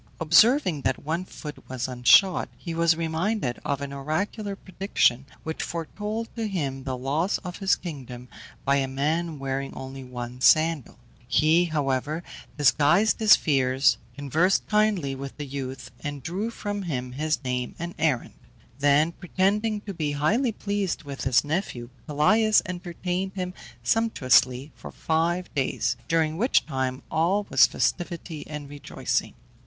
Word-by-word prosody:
Observing 180 - +4
that 130 +1 -1
one 165 +4 -1
foot 150 -5 -9
was 130 -1 -3
unshod, 130 +10 +4
he 170 - -6
was 165 0 +3
reminded 165 - -1
of 140 -1 -2
an 140 0 -5
oracular 195 +9 -3
prediction 180 - 0 0.2
which 160 0 -4
foretold 210 +7 -4
to 225 -2 -2
him 140 -9 -3
the 130 -2 -3
loss 145 +9 0
of 180 -1 -6
his 195 -2 +2
kingdom 130 -7 -8 0.4
by 140 +1 +3
a 135 -1 0
man 155 +4 -1
wearing 135 0 -3
only 135 0 -7
one 125 0 -7
sandal. 155 -5 +3 0.3
He, 155 +7 +4
however, 150 0 -1 0.3
disguised 155 - +4
his 215 -2 +8
fears, 135 -2 +2 0.2
conversed 155 +7 +1
kindly 210 -10 +1
with 135 0 -7
the 145 - -5
youth, 130 -2 -6
and 145 -2 -6
drew 195 - -2
from 205 -3 -4
him 130 -9 -3
his 155 +3 -1
name 125 -1 -2
and 170 +1 -5
errand. 155 -6 0 0.5
Then 145 +3 +4
pretending 205 +5 0
to 205 -1 -6
be 155 -4 -2
highly 220 - +1
pleased 200 -5 -2
with 140 -2 -6
his 130 -2 +4
nephew, 145 -7 -3 0.2
Pelias 210 +9 +4
entertained 180 +1 -3
him 180 -1 -3 0.3
sumptuously 130 - +2
for - - -10
five 170 +3 -1
days, 135 -3 0
during 160 -1 +1
which 245 +7 +3
time 130 -2 -3
all 180 +6 +1
was - - +7
festivity 170 -3 -2
and 150 -2 -6
rejoicing. 145 -1 -3
155 Hz, 145 wpm, -26 LUFS, 135-185 Hz, 0.5 s, his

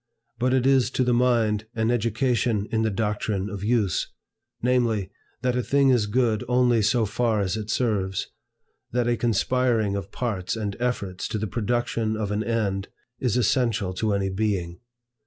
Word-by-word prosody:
But 125 +1 +2
it 130 -1 +2
is 135 -2 +4
to 130 - +3
the 125 -1 +2
mind 115 -3 +2
an 110 +1 +1
education 115 -2 0
in 110 - +1
the 110 - +2
doctrine 105 -1 -2
of 100 -1 -6
Use, 105 -6 +1 0.5
namely, 120 -5 +1 0.3
that 125 -1 +1
a 125 - +1
thing 140 +2 +3
is 120 -5 +3
good 115 0 +1
only 125 -2 +3
so 110 +2 +2
far 110 +1 0
as 95 0 0
it 110 -1 -5
serves; 100 -6 0 0.7
that 120 0 0
a 120 - +2
conspiring 115 -1 +1
of 100 -1 -5
parts 105 -7 -2
and 105 -3 -3
efforts 100 -7 -2
to - - -3
the 110 - -2
production 115 0 -1
of 105 -2 -2
an 105 +1 0
end, 100 -4 -1 0.3
is 125 -2 +1
essential 115 -5 +1
to 105 +2 0
any 100 -1 0
being. 95 -4 -2
110 Hz, 170 wpm, -25 LUFS, 100-120 Hz, 0.7 s, is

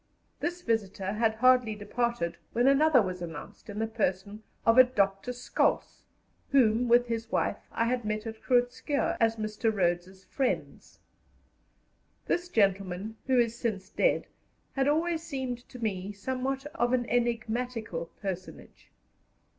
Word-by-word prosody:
This 350 +1 -3
visitor 200 -4 -1
had 220 0 +1
hardly 250 -2 +4
departed 205 -4 -2 0.2
when 240 +2 +2
another 275 -2 +5
was 185 -1 -4
announced 165 +5 -8
in 205 - -6
the 220 - 0
person 210 -2 -2 0.2
of 230 +2 +6
a - - +12
Dr. 200 -3 0
Scholtz, 250 0 0 0.5
whom, 245 -3 +4
with 240 +1 +5
his 230 -1 -4
wife, - - -1
I 230 - 0
had 245 0 0
met 215 +1 -2
at 220 -1 -7
Groot 245 -1 +3
Schuurr 285 +2 -1
as 225 -1 +3
Mr. 215 +1 -1
Rhodes's 185 -1 -1
friends. 265 -3 -3 1.3
This 350 0 -1
gentleman, 195 - 0
who 260 -1 +3
is 235 -1 +2
since 210 -6 -3
dead, - - +2 0.5
had 270 0 +1
always 325 +2 +1
seemed 265 -6 -5
to 250 - -10
me 205 -4 -3
somewhat 260 +6 -3
of 240 +1 +1
an 245 -1 +2
enigmatical 235 -6 -1 0.2
personage. 185 -2 -7
230 Hz, 140 wpm, -29 LUFS, 200-250 Hz, 1.3 s, a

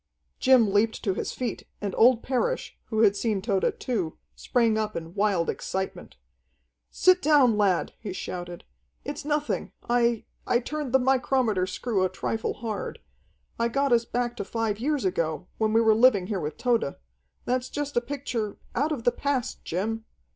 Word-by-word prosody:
Jim 250 -6 +5
leaped 220 +2 +2
to 195 - +1
his - - -3
feet, 245 -3 -4
and 200 -2 -3
old 235 0 +5
Parrish, 275 - -1
who 220 -1 0
had 205 -3 +5
seen 210 -1 0
Tode 195 -1 0
too, 195 -11 -2 0.2
sprang 230 -3 +1
up 215 -1 -1
in 165 0 -6
wild 195 -4 +1
excitement. 190 0 -4 0.7
"Sit 370 0 +4
down, 285 -7 +5
lad," 200 -4 +1
he 210 - -6
shouted. 175 -1 -6 0.4
"It's 290 +1 -5
nothing. 295 0 -1
I 235 -1 +2 0.2
I 240 - +4
turned 290 +2 -4
the 265 - +6
micrometer 250 -6 +2
screw 195 +1 -1
a 185 - +2
trifle 220 +4 -2
hard. 220 -2 -4 0.6
I 235 - +2
got 275 +2 +1
us 235 -1 +3
back 240 0 -2
to - - -2
five 220 0 -2
years 285 -1 0
ago, 165 -3 -1
when 220 -1 +2
we 225 +1 +4
were 220 -1 +5
living 220 -4 +5
here 195 0 -2
with 150 -2 -4
Tode. 235 - +1 0.5
That's 255 0 -1
just 290 -1 -4
a 240 - +3
picture 240 -5 -4 0.2
out 290 +6 0
of 270 -7 -3
the 245 - +4
past, 275 -3 -2
Jim!" 220 +6 -2
230 Hz, 170 wpm, -26 LUFS, 200-255 Hz, 0.7 s, the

